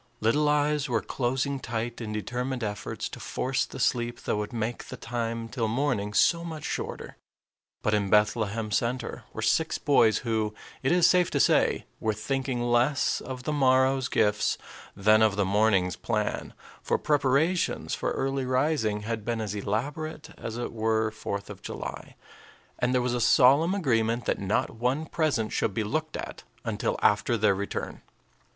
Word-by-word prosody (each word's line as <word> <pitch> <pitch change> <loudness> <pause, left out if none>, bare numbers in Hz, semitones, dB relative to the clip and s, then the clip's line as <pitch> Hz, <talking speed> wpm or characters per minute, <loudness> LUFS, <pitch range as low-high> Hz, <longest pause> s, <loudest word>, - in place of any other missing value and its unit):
Little 145 +7 +2
eyes 150 -1 +1
were 115 -3 0
closing 135 +2 -1
tight 115 0 -4
in 110 -2 -4
determined 125 +4 -3
efforts 105 -1 -4
to - - -9
force 135 +1 -1
the - - -9
sleep 120 -1 0
that - - -1
would 105 0 -3
make 115 0 -3
the - - -8
time 115 -1 -3
till 115 -1 -2
morning 110 -4 -1
so 170 +8 +4
much 160 -3 -6
shorter. - - -5 0.7
But 105 - +1
in 100 -2 +1
Bethlehem 105 +1 +2
Center 120 +5 -2
were - - -5
six 160 0 +2
boys 115 -7 +4
who, 110 -2 0 0.3
it 135 - +1
is 175 -1 +5
safe 180 -1 +4
to - - 0
say, - - +3
were 110 -1 0
thinking 130 +2 -2
less 120 +4 +2
of 130 -1 -6
the 150 - -1
morrow's 130 -1 +3
gifts 105 -1 +1 0.4
than 105 +2 +4
of 110 -3 +4
the 100 -1 +1
morning's 95 -2 +2
plan; - - -2 0.3
for - - 0
preparations 150 +5 +1
for - - -1
early 135 -1 -1
rising 130 -5 +1
had 110 0 -3
been 115 +1 -2
as 105 -2 -3
elaborate 145 +10 -3
as 115 0 -6
if 120 - -3
it - - -7
were 110 0 +1
fourth 100 -2 -5
of - - -10
July, - - -7 0.6
and 125 0 +1
there 125 -1 +2
was 125 -1 0
a 120 - -1
solemn 145 - +5
agreement 115 - +1
that - - 0
not 100 +1 0
one 125 +7 -1
present 155 -10 0
should 100 - 0
be 110 - 0
looked 155 +8 -2
at - - -7 0.2
until - - -1
after 105 +3 +3
their 105 -2 +3
return. 100 +1 -4
120 Hz, 170 wpm, -27 LUFS, 110-135 Hz, 0.7 s, is